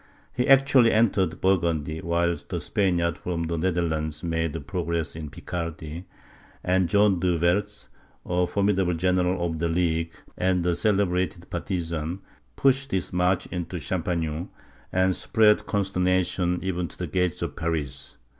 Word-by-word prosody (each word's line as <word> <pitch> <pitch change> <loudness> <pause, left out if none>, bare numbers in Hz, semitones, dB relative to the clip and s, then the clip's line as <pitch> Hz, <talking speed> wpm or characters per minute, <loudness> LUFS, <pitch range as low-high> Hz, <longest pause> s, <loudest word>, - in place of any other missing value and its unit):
He 125 +1 0
actually 135 -3 +6
entered 95 -7 +2
Burgundy, 85 -5 +1
while 85 0 +1
the - - -2
Spaniards 85 -3 0
from 85 -2 -3
the 85 +1 -2
Netherlands 80 -3 -1
made 80 -2 -2
progress 85 0 -2
in 80 -2 -6
Picardy; 85 +2 -6 0.6
and 90 -1 +2
John 100 -3 +4
De 90 -1 +1
Werth, 105 +5 0 0.4
a 90 0 +1
formidable 95 -2 +1
general 90 +1 +1
of 80 -2 -3
the 85 0 0
League, 80 -1 0 0.2
and 90 -1 +1
a 90 -1 +2
celebrated 95 -4 0
partisan, 85 -1 -3 0.3
pushed 135 0 +2
his 95 -6 -2
march 90 +1 +2
into 90 0 -4
Champagne, 85 -1 -2 0.4
and 95 0 +2
spread 105 -2 +3
consternation 90 -2 +1
even 90 -2 -1
to - - -15
the 90 - -3
gates 90 +1 -1
of - - -4
Paris. 75 -5 -4
90 Hz, 135 wpm, -25 LUFS, 85-95 Hz, 0.6 s, actually